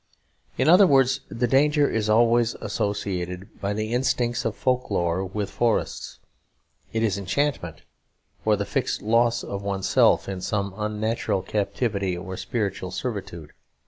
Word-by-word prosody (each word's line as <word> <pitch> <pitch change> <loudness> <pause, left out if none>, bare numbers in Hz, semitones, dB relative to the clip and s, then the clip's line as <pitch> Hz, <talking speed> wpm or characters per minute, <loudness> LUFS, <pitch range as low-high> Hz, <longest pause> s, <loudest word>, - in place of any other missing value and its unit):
In 130 - +1
other 185 +4 +7
words, 135 -3 +4
the 120 +2 -1
danger 145 +4 +3
is 110 -1 -1
one 110 - +5
always 120 0 +3
associated, 95 -3 -4
by 100 - -1
the 110 +2 -3
instinct 125 -1 0
of 115 - -1
folk 125 -1 0
lore, 85 -2 0
with 100 +2 -4
forests; 120 -2 -1 0.7
it 110 0 -1
is 100 -3 0
enchantment, 100 - -2 0.6
or 110 -1 +3
the 100 0 -3
fixed - - -2
loss 115 +2 +2
of 100 0 -5
oneself 100 -1 +2
in 95 -2 -4
some 100 0 -2
unnatural 105 -2 -1
captivity 100 -2 -1
or 95 +2 -6
spiritual 100 -5 -3
servitude. 95 - -5
105 Hz, 145 wpm, -24 LUFS, 95-120 Hz, 0.7 s, other